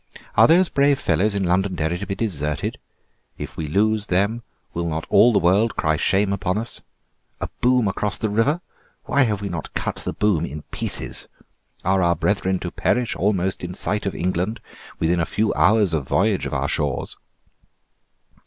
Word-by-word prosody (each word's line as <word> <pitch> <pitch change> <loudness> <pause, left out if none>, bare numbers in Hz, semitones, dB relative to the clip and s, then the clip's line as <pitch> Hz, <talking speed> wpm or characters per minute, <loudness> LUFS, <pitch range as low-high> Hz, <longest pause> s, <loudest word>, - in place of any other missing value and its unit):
"Are - - +7
those 175 +3 +5
brave 140 -1 +3
fellows 105 -5 +1
in 100 - 0
Londonderry 90 -2 0
to 100 - -5
be 95 - -2
deserted? 75 -10 -2 0.6
If - - -7
we 80 - -4
lose 105 +5 +1
them 100 +6 +1 0.3
will 85 0 -2
not 80 0 -3
all 120 - +6
the 105 - +2
world 100 +6 +3
cry 80 0 +1
shame 100 +6 +1
upon 95 0 -1
us? 115 +2 -5 0.6
A - - -4
boom 125 -2 +3
across 100 +1 -1
the 110 - -1
river! 135 +11 +1 0.4
Why 140 - +2
have 105 -3 -2
we - - -2
not 80 -3 -6
cut - - -2
the - - -4
boom 100 -7 +1
in 75 -1 -6
pieces? - - -2 0.6
Are 95 +1 +3
our 85 -1 +3
brethren 95 -1 0
to 90 - -4
perish 125 -1 0
almost 95 -1 0
in 90 +1 -5
sight 105 +1 -2
of 100 - -3
England, 95 +5 -1 0.4
within 85 +2 +1
a - - +2
few 105 +2 0
hours' 100 -2 +3
voyage 95 +8 +1
of - - -6
our - - 0
shores?" - - -2
100 Hz, 175 wpm, -22 LUFS, 85-110 Hz, 0.6 s, Are